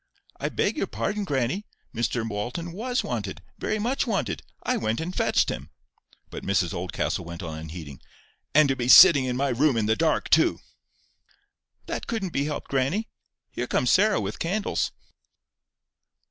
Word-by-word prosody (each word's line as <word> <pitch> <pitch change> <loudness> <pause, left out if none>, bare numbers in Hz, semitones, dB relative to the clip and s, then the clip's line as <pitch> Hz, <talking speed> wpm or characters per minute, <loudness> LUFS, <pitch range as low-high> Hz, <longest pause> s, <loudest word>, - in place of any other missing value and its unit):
"I - - -1
beg - - 0
your - - -1
pardon, 210 -1 -2
grannie, 140 - -1 0.3
Mr 115 0 -1
Walton 120 +11 -4
WAS 245 +7 -2
wanted—very 105 - -4
much 245 +5 -1
wanted. 125 - -1 0.2
I - - +1
went 110 +1 -1
and 175 +3 -4
fetched - - +2
him." 65 +3 -5 0.6
But - - -7
Mrs 95 -3 +1
Oldcastle 90 0 -2
went 85 +2 -8
on 80 -2 -5
unheeding. 80 -3 -8 0.3
"— - - -38
and 155 -1 +7
to 135 - +1
be 125 -2 -3
sitting 145 -1 +9
in 125 -1 -2
my 140 +1 +1
room 130 +1 +2
in 110 - +1
the 110 +1 +2
dark 160 +2 +1
too!" - - +4 1.3
"That - - -5
couldn't 205 -7 -3
be 140 - 0
helped, 150 -1 -5
grannie. 140 - 0 0.4
Here 120 - -3
comes 125 0 +1
Sarah 210 +2 +4
with 100 0 -4
candles." 200 +5 -1
130 Hz, 160 wpm, -26 LUFS, -, 1.3 s, sitting